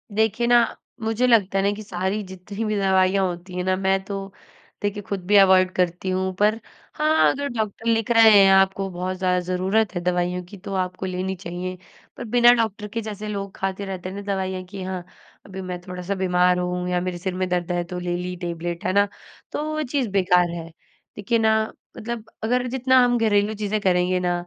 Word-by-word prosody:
देखिए 220 Hz, +2 st, +1 dB
ना, 240 Hz, -1 st, +4 dB, 0.3 s
मुझे 225 Hz, +3 st, +1 dB
लगता 205 Hz, -5 st, +3 dB
है 195 Hz, -, +2 dB
ना 200 Hz, -, +2 dB
कि 215 Hz, -, -8 dB
सारी 190 Hz, +1 st, -2 dB
जितनी 190 Hz, +3 st, -7 dB
भी 215 Hz, 0 st, -1 dB
दवाइयाँ 190 Hz, 0 st, +3 dB
होती 175 Hz, +1 st, -7 dB
हैं 180 Hz, -, -2 dB
ना 185 Hz, 0 st, +1 dB
मैं 190 Hz, 0 st, +1 dB
तो, 195 Hz, 0 st, -6 dB, 0.5 s
देखिए 205 Hz, 0 st, -2 dB
खुद 195 Hz, -1 st, -4 dB
भी 205 Hz, -, +3 dB
अवॉइड 185 Hz, -1 st, +6 dB
करती 180 Hz, +1 st, 0 dB
हूँ 185 Hz, 0 st, -1 dB
पर 210 Hz, +2 st, +3 dB, 0.3 s
हाँ, 310 Hz, +1 st, +3 dB
अगर 285 Hz, +1 st, -3 dB
डॉक्टर 220 Hz, -1 st, -4 dB
लिख 225 Hz, 0 st, +1 dB
रहे 225 Hz, -1 st, +7 dB
हैं 195 Hz, -, +6 dB
आपको 195 Hz, 0 st, +3 dB
बहुत 185 Hz, +1 st, -4 dB
ज़्यादा 180 Hz, -1 st, +1 dB
ज़रूरत 185 Hz, +3 st, 0 dB
है 175 Hz, -, -1 dB
दवाइयों 180 Hz, 0 st, -1 dB
की 180 Hz, +3 st, -12 dB
तो 195 Hz, +1 st, -7 dB
आपको 185 Hz, 0 st, -2 dB
लेनी 185 Hz, +1 st, -3 dB
चाहिए, 180 Hz, 0 st, -6 dB, 0.4 s
पर -, -, -5 dB
बिना 240 Hz, +1 st, +6 dB
डॉक्टर 220 Hz, -3 st, -1 dB
के 230 Hz, +3 st, -4 dB
जैसे 215 Hz, -1 st, -6 dB
लोग 200 Hz, -2 st, -5 dB
खाते 195 Hz, +1 st, -3 dB
रहते 185 Hz, -2 st, -5 dB
हैं 190 Hz, -, -8 dB
ना 200 Hz, -, -5 dB
दवाइयाँ 190 Hz, -1 st, -3 dB
की 195 Hz, +1 st, -8 dB
हाँ, 185 Hz, -1 st, -4 dB, 0.4 s
अभी 190 Hz, -1 st, -7 dB
मैं 180 Hz, -1 st, -5 dB
थोड़ा-सा 180 Hz, +1 st, -5 dB
बीमार 180 Hz, -1 st, +2 dB
हूँ 180 Hz, 0 st, -2 dB
या 180 Hz, 0 st, 0 dB
मेरे 180 Hz, -1 st, -3 dB
सिर 185 Hz, +1 st, -3 dB
में 185 Hz, 0 st, -1 dB
दर्द 175 Hz, -1 st, -1 dB
है 175 Hz, 0 st, 0 dB
तो 180 Hz, +1 st, -6 dB
ले 175 Hz, 0 st, -2 dB
ली 180 Hz, +1 st, -4 dB
टैबलेट 170 Hz, 0 st, -4 dB
है -, -, +1 dB
ना? 200 Hz, +1 st, +4 dB, 0.4 s
तो -, -, -2 dB
वो 310 Hz, 0 st, -1 dB
चीज़ 265 Hz, -3 st, -1 dB
बेकार 180 Hz, -2 st, +3 dB
है। 170 Hz, -1 st, -6 dB, 0.5 s
देखिए 205 Hz, +3 st, 0 dB
ना 220 Hz, 0 st, +3 dB, 0.4 s
मतलब 230 Hz, 0 st, -5 dB, 0.2 s
अगर 250 Hz, +3 st, +1 dB
जितना 260 Hz, +1 st, +2 dB
हम 245 Hz, 0 st, +3 dB
घरेलू 210 Hz, -2 st, +2 dB
चीजें 215 Hz, 0 st, -1 dB
करेंगे 180 Hz, -1 st, +2 dB
ना 180 Hz, -1 st, 0 dB
190 Hz, 210 wpm, -23 LUFS, 180-215 Hz, 0.5 s, रहे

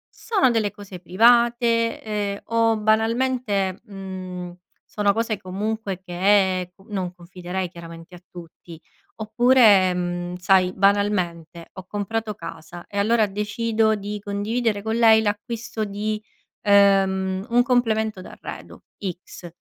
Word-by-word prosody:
Sono 395 Hz, -, +1 dB
delle 220 Hz, -4 st, 0 dB
cose 200 Hz, -3 st, -11 dB
private, 230 Hz, +4 st, +3 dB
ehm, 205 Hz, -2 st, -3 dB
o 230 Hz, -1 st, +2 dB
banalmente, 220 Hz, -2 st, 0 dB
mhmm, 185 Hz, -3 st, -8 dB, 0.3 s
sono 205 Hz, -1 st, 0 dB
cose 225 Hz, -1 st, -1 dB
comunque 200 Hz, 0 st, -4 dB
che 185 Hz, 0 st, +1 dB
com 195 Hz, -, -22 dB
non 185 Hz, -3 st, -3 dB
confiderei 180 Hz, +1 st, -6 dB
chiaramente 170 Hz, 0 st, -11 dB
a 175 Hz, -, -15 dB
tutti, 170 Hz, -1 st, -13 dB, 0.4 s
oppure, 220 Hz, -4 st, +4 dB
mhmm, 175 Hz, 0 st, -3 dB
sai 185 Hz, 0 st, +3 dB
banalmente 185 Hz, -4 st, 0 dB
ho 190 Hz, -1 st, -10 dB
comprato 210 Hz, +2 st, -3 dB
casa 165 Hz, -1 st, -10 dB
e 200 Hz, -, -8 dB
allora 215 Hz, +2 st, +3 dB
decido 220 Hz, +2 st, 0 dB
di 205 Hz, 0 st, -5 dB
condividere 205 Hz, +2 st, -2 dB
con 220 Hz, +2 st, -2 dB
lei 225 Hz, -1 st, +6 dB
l'acquisto 220 Hz, +1 st, -3 dB
di, 210 Hz, +1 st, -3 dB, 0.4 s
ehm, 195 Hz, -1 st, +3 dB
un 240 Hz, +1 st, +4 dB
complemento 220 Hz, -5 st, +1 dB
d'arredo -, -, -10 dB, 0.4 s
X, 175 Hz, -, -11 dB
205 Hz, 120 wpm, -23 LUFS, 185-220 Hz, 0.4 s, lei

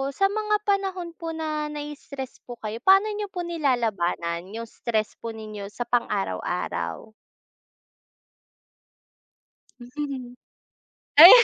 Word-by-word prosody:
sa 390 Hz, -, +4 dB
mga 425 Hz, 0 st, +1 dB
panahon 385 Hz, -3 st, 0 dB
po 330 Hz, -1 st, -5 dB
na 310 Hz, -1 st, -2 dB
na 300 Hz, -, -4 dB
i-stress 280 Hz, -3 st, -7 dB
po 245 Hz, -, -6 dB
kayo 215 Hz, +1 st, -4 dB
paano 390 Hz, +2 st, +7 dB
niyo 415 Hz, 0 st, -2 dB
po 360 Hz, -2 st, -3 dB
nilalabanan 210 Hz, -, 0 dB
yung 230 Hz, 0 st, -5 dB
stress 220 Hz, -1 st, -1 dB
po 230 Hz, -, -3 dB
ninyo 215 Hz, -2 st, -6 dB
sa 240 Hz, -, -3 dB
pang 245 Hz, -1 st, +2 dB
araw-araw? 90 Hz, -, -2 dB, 2.7 s
Hmm, 255 Hz, 0 st, -5 dB, 0.8 s
ay! 335 Hz, +5 st, +14 dB
250 Hz, 115 wpm, -26 LUFS, 215-335 Hz, 2.7 s, ay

